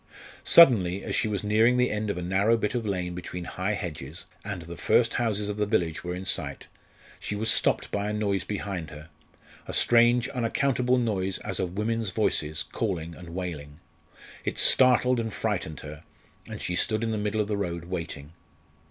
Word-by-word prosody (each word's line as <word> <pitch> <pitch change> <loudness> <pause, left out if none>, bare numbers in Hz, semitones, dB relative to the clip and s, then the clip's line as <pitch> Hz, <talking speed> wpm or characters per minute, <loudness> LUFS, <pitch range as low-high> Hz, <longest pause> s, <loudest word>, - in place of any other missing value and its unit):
Suddenly 100 - +6
as - - -4
she - - +1
was 105 -2 -2
nearing 110 +4 +3
the 125 0 +2
end 105 0 -2
of 100 - -2
a 90 - -4
narrow 100 +6 +2
bit 105 -2 -2
of 120 -3 -2
lane 90 -3 -2
between 90 0 -6
high 95 +4 -2
hedges, 80 -3 -7 0.2
and 100 -4 -5
the 85 +1 -8
first 115 +7 +2
houses 105 -3 0
of 105 0 -4
the 105 -1 0
village 85 -7 0
were 90 0 -4
in 95 +1 -7
sight, - - -3 0.5
she 105 - -4
was 110 +2 +1
stopped - - +1
by 100 0 -1
a - - -2
noise 100 -3 0
behind 95 -5 -4
her 75 +1 -11 0.6
a - - -4
strange 120 0 +5
unaccountable 125 0 +1
noise 95 -6 -1
as 95 -3 -1
of 90 0 -3
women's 115 0 0
voices, 80 -7 0
calling 85 -6 -3
and 85 0 -11
wailing. 80 -5 -6 0.6
It - - -3
startled 125 -1 +4
and 115 -1 -3
frightened 100 -8 -3
her, 75 -1 -9 0.5
and - - -7
she 90 - -3
stood 110 +4 +1
in 115 - -1
the 110 - -2
middle 105 +1 -1
of 105 - 0
the 105 - -1
road 85 -4 -3
waiting. 85 -4 -6
100 Hz, 190 wpm, -27 LUFS, 90-110 Hz, 0.6 s, Suddenly